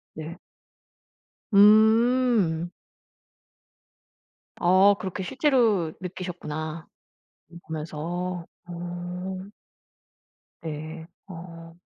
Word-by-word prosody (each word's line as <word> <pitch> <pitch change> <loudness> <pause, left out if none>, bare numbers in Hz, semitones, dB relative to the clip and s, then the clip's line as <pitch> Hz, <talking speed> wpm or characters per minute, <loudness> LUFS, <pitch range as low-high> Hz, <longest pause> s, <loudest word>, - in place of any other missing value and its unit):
네. 160 +2 -7 1.2
음. 220 -4 +5 1.9
아 190 +3 +5
그렇게 185 0 -4
실제로 235 - +2
느끼셨구나, 165 -4 -6 0.6
이거 170 - -11
보면서. 170 +3 -4 0.2
어. 175 +2 -6 1.1
네. 160 +1 -6 0.2
어. 165 -2 -10
175 Hz, 110 characters per minute, -26 LUFS, 165-200 Hz, 1.9 s, 음